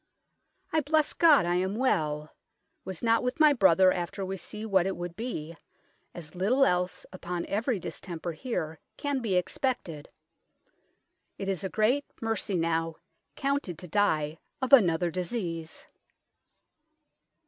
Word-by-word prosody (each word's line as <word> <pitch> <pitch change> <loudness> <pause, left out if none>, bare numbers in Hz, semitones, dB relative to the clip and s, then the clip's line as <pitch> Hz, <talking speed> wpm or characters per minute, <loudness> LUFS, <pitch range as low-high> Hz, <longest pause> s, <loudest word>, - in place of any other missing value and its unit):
I 315 - +3
blesse 305 +1 +1
God 305 - +6
I 175 +1 +1
am 190 +2 -1
well, 155 - 0 0.5
was 190 +1 -6
not 230 0 +3
with 250 +5 -2
my 305 -2 +7
brother 190 -5 +5
after 180 +2 -3
we 190 +1 -3
see 210 +4 -7
what 190 -4 +2
it 195 - -3
would 175 -1 -5
bee, 170 -8 -5 0.6
as 155 -3 -9
little 230 +10 +3
else 180 -2 0
upon 175 -1 -4
every 225 +3 0
distemper 170 0 -6
here 160 - -4 0.2
can 285 -2 -1
be 220 -6 -1
expected: 180 - -2 1.3
it 195 - -5
is 195 -1 -2
a 190 - -2
greate 240 +8 +2
mercy 225 -4 -1
now 165 -1 0 0.4
counted 275 - -1
to 180 - -10
dye 160 -5 +1 0.2
of 260 +1 -2
another 175 -8 +5
disease." 170 -3 -4
190 Hz, 135 wpm, -28 LUFS, 170-235 Hz, 1.3 s, my